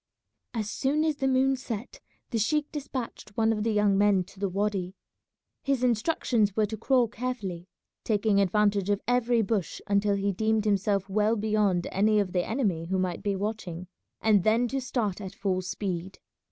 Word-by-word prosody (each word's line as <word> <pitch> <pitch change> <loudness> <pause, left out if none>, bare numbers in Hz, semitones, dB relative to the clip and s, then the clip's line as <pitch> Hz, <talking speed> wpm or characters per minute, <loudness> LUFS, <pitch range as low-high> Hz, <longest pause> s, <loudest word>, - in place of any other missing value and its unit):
As 215 -3 -1
soon 275 +7 0
as 310 -2 0
the 270 - 0
moon 265 +1 +3
set 240 -3 -6 0.3
the 230 - 0
sheik 295 +7 0
despatched 260 -7 -6
one 225 0 +3
of 210 - -2
the 225 +1 +1
young 210 -2 +3
men 200 -2 +4
to 190 +1 -17
the 200 -1 0
wady. 195 -1 -2 0.7
His 275 -2 0
instructions 235 - +1
were 215 - +3
to 215 +2 -5
crawl 245 +2 +2
carefully, 215 -7 -5 0.4
taking 210 -2 +2
advantage 200 0 +2
of 205 -1 +2
every 245 -1 +2
bush 195 -4 -2
until 200 0 +2
he 200 0 0
deemed 220 +2 0
himself 200 -1 +1
well 210 +3 +2
beyond 210 -4 +1
any 210 +2 +3
of 195 -3 -1
the 180 -1 +1
enemy 200 -9 -1
who 190 +2 0
might 185 -2 -1
be 200 -1 -1
watching, 190 -4 -4 0.4
and 210 -4 +4
then 225 +4 +3
to 270 +2 -2
start 225 -6 -2
at 195 -1 -7
full 190 -2 -1
speed. 185 -1 -4
210 Hz, 180 wpm, -27 LUFS, 195-230 Hz, 0.7 s, men